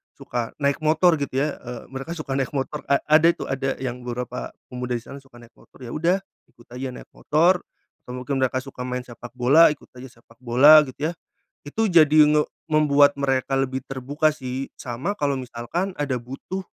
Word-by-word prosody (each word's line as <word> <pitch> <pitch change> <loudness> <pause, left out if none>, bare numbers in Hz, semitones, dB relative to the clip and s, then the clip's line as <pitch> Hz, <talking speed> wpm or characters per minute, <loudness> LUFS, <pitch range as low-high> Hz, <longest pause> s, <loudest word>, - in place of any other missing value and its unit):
suka 120 -2 -4
naik 140 +1 +1
motor 160 +2 +4
gitu 135 -2 -2
ya, 150 +2 -1
eee, 120 -1 -7
mereka 135 +5 -6
suka 155 -4 -5
naik 135 -2 -1
motor, 140 +2 -3
a 140 - +4
ada 155 +2 +6
itu - - -7
ada 135 0 -2
yang 125 -1 -4
beberapa 125 0 -5 0.2
pemuda 125 0 -4
di 115 - -9
sana 140 - -10
suka 120 -3 -17
naik 120 - -17
motor. - - -22
Yaudah, 165 +9 0 0.3
ikut 120 -1 -21
aja 130 +1 -4
naik - - -12
motor, 170 +4 +2 0.4
atau 125 - -8
mungkin 130 +2 -3
mereka 130 0 0
suka 130 -2 -8
main 125 0 -3
sepak 120 0 -11
bola, 135 +6 +5
ikut - - -19
aja 125 -1 -12
sepak 115 -1 -23
bola 145 +6 +7
gitu 145 +4 -4
ya. - - -5 0.5
Itu 220 +7 -1
jadi, 155 -2 +6
nge 150 0 +3 0.2
membuat 150 -2 +4
mereka 135 -1 0
lebih 130 -1 -2
terbuka 140 +4 0
sih, 130 -1 -5
sama 125 - -4
kalo 140 -7 -1
misalkan 130 +10 -4
ada 140 -5 -2
butuh, 135 +10 -7
135 Hz, 190 wpm, -23 LUFS, 125-150 Hz, 0.5 s, bola